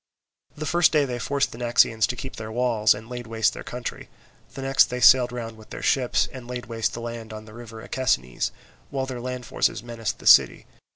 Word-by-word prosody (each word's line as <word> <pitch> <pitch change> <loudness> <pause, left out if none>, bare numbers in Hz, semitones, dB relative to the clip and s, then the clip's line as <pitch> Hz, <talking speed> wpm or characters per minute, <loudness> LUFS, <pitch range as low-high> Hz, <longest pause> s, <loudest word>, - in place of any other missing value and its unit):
The 155 - -4
first 170 +1 +3
day 150 -3 +3
they 125 -2 -4
forced 140 +3 0
the 115 - -10
Naxians 115 -2 +3
to 125 - -3
keep 130 +2 -8
their 110 0 -6
walls, 115 -3 +2
and 110 +2 -10
laid 120 -1 -7
waste 110 -1 +1
their - - -8
country; 125 0 -6 0.5
the 135 - -6
next 135 0 +5
they 125 - -5
sailed 125 -1 +6
round 115 -2 -6
with 110 - -16
their - - -8
ships, 125 -3 +2
and 130 -2 -9
laid 125 0 -5
waste 115 -2 -2
their 115 - -6
land 115 -1 -6
on 110 0 -8
the 110 - -14
river 115 -1 -10
Akesines, 65 - 0 0.4
while 135 -1 -2
their 130 -2 -6
land 125 0 -5
forces 110 - -1
menaced 115 -3 -4
the - - -15
city. - - +6
120 Hz, 220 wpm, -24 LUFS, 115-125 Hz, 0.5 s, sailed